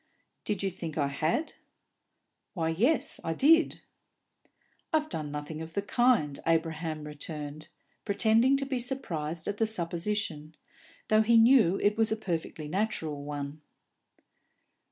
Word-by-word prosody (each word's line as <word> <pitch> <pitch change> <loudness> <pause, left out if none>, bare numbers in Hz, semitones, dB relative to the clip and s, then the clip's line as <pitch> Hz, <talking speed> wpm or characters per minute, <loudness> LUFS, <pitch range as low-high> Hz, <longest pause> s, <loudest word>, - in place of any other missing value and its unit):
"Did 205 -2 -1
you 195 - 0
think 165 -3 -7
I 140 -2 +1
had?" 155 - -1 1.0
"Why, 165 -3 0
yes, 235 - +1
I 165 - -2
did." 325 - +4 1.1
"I've 310 -1 +1
done 155 - -3
nothing 150 +2 -6
of 160 0 -9
the 200 - 0
kind," 210 - +2
Abraham 160 -1 0
returned, 150 0 -7 0.4
pretending 225 +6 +3
to 275 - -1
be 265 -2 -2
surprised 170 - -2
at 205 - -2
the 225 - +2
supposition, 170 -4 -2 0.5
though 215 0 +5
he 230 +1 +4
knew 225 -6 +5
it 205 +1 +2
was 225 -1 +2
a 220 - 0
perfectly 165 -6 -4
natural 160 -6 -2
one. 145 +1 -6
170 Hz, 135 wpm, -29 LUFS, 155-220 Hz, 1.1 s, though